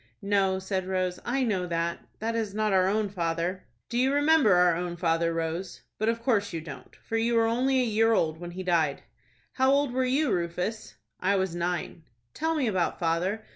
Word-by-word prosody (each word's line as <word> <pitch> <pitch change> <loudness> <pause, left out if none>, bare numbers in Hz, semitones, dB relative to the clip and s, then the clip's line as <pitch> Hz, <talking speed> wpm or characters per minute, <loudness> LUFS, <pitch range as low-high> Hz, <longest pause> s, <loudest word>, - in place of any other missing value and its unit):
"No," 195 -2 +2
said 190 -1 -3
Rose, 185 -1 -1
"I 265 +2 0
know 190 -7 0
that,—that 170 +6 -3
is 215 -3 -2
not 215 -1 +1
our 185 -1 +4
own 210 +2 +1
father." 175 0 -2 0.2
"Do 240 - -2
you 260 +2 +3
remember 290 -7 +4
our 180 -1 +4
own 175 0 -4
father, 165 -1 +1
Rose? 165 +3 -4 0.2
But 215 +1 +1
of 230 0 -2
course 205 -5 +1
you 165 - -2
don't, 155 -3 -10
for 225 - -2
you 230 +1 +1
were 230 0 +4
only 255 +4 +2
a 235 -4 -1
year 225 +1 +4
old 160 -7 +1
when 175 0 -7
he 185 +2 -6
died." 165 -6 +1 0.5
"How 265 0 +3
old 280 -2 +2
were 260 +1 +1
you, 265 +1 +1
Rufus?" 180 +5 -3 0.2
"I 195 +2 +2
was 190 -3 0
nine." 175 0 -3 0.3
"Tell 320 +1 -1
me 290 -4 +1
about 190 -6 0
father. 180 +6 -1
190 Hz, 200 wpm, -27 LUFS, 175-230 Hz, 0.5 s, our